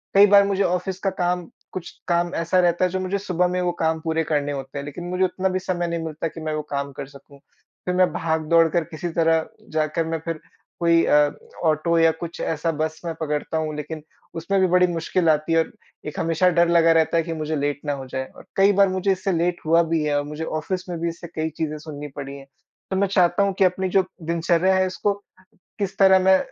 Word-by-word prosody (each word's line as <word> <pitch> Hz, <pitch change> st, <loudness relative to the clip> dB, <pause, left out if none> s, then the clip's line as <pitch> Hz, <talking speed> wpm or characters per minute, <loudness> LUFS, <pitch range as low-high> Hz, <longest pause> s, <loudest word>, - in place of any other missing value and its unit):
कई 200 Hz, +1 st, +8 dB
बार 200 Hz, 0 st, +7 dB
मुझे 200 Hz, 0 st, +1 dB
ऑफिस 180 Hz, +1 st, -1 dB
का 195 Hz, -, 0 dB
काम 175 Hz, -1 st, 0 dB, 0.3 s
कुछ 185 Hz, -2 st, -6 dB, 0.2 s
काम 175 Hz, 0 st, +1 dB
ऐसा 175 Hz, +3 st, +2 dB
रहता 175 Hz, 0 st, +3 dB
है 180 Hz, -, -1 dB
जो 190 Hz, -, -1 dB
मुझे 185 Hz, +1 st, -1 dB
सुबह 180 Hz, -3 st, 0 dB
में 180 Hz, 0 st, -1 dB
वो 180 Hz, -1 st, +1 dB
काम 160 Hz, 0 st, +1 dB
पूरे 160 Hz, 0 st, 0 dB
करने 145 Hz, -1 st, 0 dB
होते 135 Hz, 0 st, -6 dB
हैं 140 Hz, -, -6 dB
लेकिन 145 Hz, +4 st, -7 dB
मुझे 180 Hz, +1 st, 0 dB
उतना 185 Hz, +1 st, -1 dB
भी 185 Hz, 0 st, -1 dB
समय 180 Hz, -2 st, -2 dB
नहीं 170 Hz, -1 st, -3 dB
मिलता 160 Hz, 0 st, -3 dB
कि 165 Hz, +1 st, -9 dB
मैं 155 Hz, 0 st, -3 dB
वो 155 Hz, -, -2 dB
काम 140 Hz, 0 st, -2 dB
कर -, -, -4 dB
सकूँ। 140 Hz, 0 st, -16 dB, 0.5 s
फिर 180 Hz, -, -1 dB
मैं 185 Hz, 0 st, +3 dB
भाग-दौड़ 165 Hz, +1 st, +2 dB
कर 170 Hz, +1 st, +1 dB
किसी 170 Hz, +1 st, -6 dB
तरह 165 Hz, -1 st, +2 dB, 0.2 s
जाकर 155 Hz, +1 st, 0 dB
मैं 165 Hz, 0 st, -2 dB
फिर 165 Hz, -2 st, -3 dB, 0.4 s
कोई 170 Hz, -1 st, +4 dB
अ, 145 Hz, 0 st, +4 dB, 0.3 s
ऑटो 160 Hz, +2 st, +2 dB
या 165 Hz, 0 st, +5 dB
कुछ 165 Hz, +1 st, -8 dB
ऐसा 165 Hz, +1 st, -1 dB
बस 155 Hz, 0 st, -3 dB
मैं 165 Hz, -, -2 dB
पकड़ता 150 Hz, +1 st, -2 dB
हूँ 155 Hz, -1 st, -2 dB
लेकिन 150 Hz, +1 st, -6 dB, 0.4 s
उसमें 195 Hz, +4 st, 0 dB
भी 185 Hz, -, +4 dB
बड़ी 180 Hz, 0 st, +4 dB
मुश्किल 170 Hz, 0 st, 0 dB
आती 155 Hz, +1 st, +2 dB
है। 165 Hz, 0 st, +4 dB, 0.4 s
एक 150 Hz, -, -5 dB
हमेशा 165 Hz, +2 st, +2 dB
डर 170 Hz, 0 st, +5 dB
लगा 165 Hz, -1 st, +5 dB
रहता 165 Hz, 0 st, +3 dB
है 165 Hz, -, +2 dB
कि 165 Hz, 0 st, -4 dB
मुझे 155 Hz, 0 st, -3 dB
लेट 145 Hz, -1 st, -1 dB
ना 145 Hz, -, 0 dB
हो 135 Hz, -, -7 dB
जाए। 130 Hz, +1 st, -4 dB
और -, -, -14 dB
कई 195 Hz, +1 st, +5 dB
बार 200 Hz, -1 st, +6 dB
मुझे 185 Hz, +1 st, 0 dB
इससे 190 Hz, +1 st, -1 dB
लेट 175 Hz, +1 st, 0 dB
हुआ 165 Hz, +2 st, +4 dB
भी 160 Hz, -2 st, +2 dB
है 150 Hz, -1 st, +1 dB
और 145 Hz, -, 0 dB
मुझे 150 Hz, +2 st, -6 dB, 0.2 s
ऑफिस 185 Hz, +3 st, -4 dB
में 175 Hz, -, -3 dB
भी 170 Hz, -, 0 dB
इससे 170 Hz, +1 st, -8 dB
कई 160 Hz, 0 st, -1 dB
चीज़ें 155 Hz, -1 st, -2 dB
सुननी 150 Hz, -1 st, -7 dB
पड़ी 140 Hz, -1 st, -6 dB
है। 135 Hz, -, -12 dB, 0.5 s
तो 190 Hz, -, 0 dB
मैं 200 Hz, +1 st, +2 dB
चाहता 190 Hz, 0 st, +3 dB
हूँ 200 Hz, -1 st, +1 dB
कि -, -, +5 dB
अपनी 185 Hz, +1 st, 0 dB
जो 190 Hz, -, +5 dB, 0.3 s
दिनचर्या 170 Hz, +2 st, +2 dB
है 185 Hz, 0 st, +2 dB
उसको 200 Hz, +2 st, -1 dB, 0.7 s
किस 200 Hz, -1 st, -3 dB
तरह 190 Hz, -1 st, +7 dB
मैं 190 Hz, 0 st, +5 dB
165 Hz, 240 wpm, -23 LUFS, 155-185 Hz, 0.7 s, कई